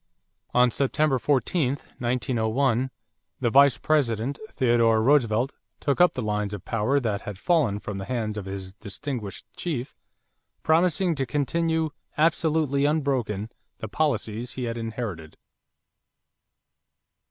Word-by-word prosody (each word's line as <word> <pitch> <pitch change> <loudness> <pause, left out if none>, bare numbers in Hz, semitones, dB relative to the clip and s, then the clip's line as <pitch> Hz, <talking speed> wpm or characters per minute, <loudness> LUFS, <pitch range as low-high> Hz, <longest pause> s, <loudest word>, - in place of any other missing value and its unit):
On 125 0 +5
September 140 +1 +1
14, 140 +1 +1 0.3
1901, 125 +1 +1 0.5
the 120 - +1
Vice 140 -3 +6
President, 130 -3 0
Theodore 115 -3 +3
Roosevelt, 125 -2 +3 0.3
took 140 +4 +1
up 180 - +5
the 125 - -2
lines 105 -1 -1
of 95 - -11
power 115 +6 +1
that 105 -6 -2
had 105 -2 -7
fallen 145 - +2
from 100 -1 -5
the 95 - -5
hands 115 -3 -2
of 105 -3 -5
his 95 -1 -6
distinguished 105 +1 -6
chief, 140 -8 -4 0.7
promising 170 +2 +3
to 135 -4 -2
continue 160 +2 0 0.3
"absolutely 155 -3 +2
unbroken" 130 -8 0 0.3
the 110 - -6
policies 120 -3 -1
he 130 - -4
had 115 -1 -2
inherited. 110 -8 -5
125 Hz, 120 wpm, -25 LUFS, 110-145 Hz, 0.7 s, Vice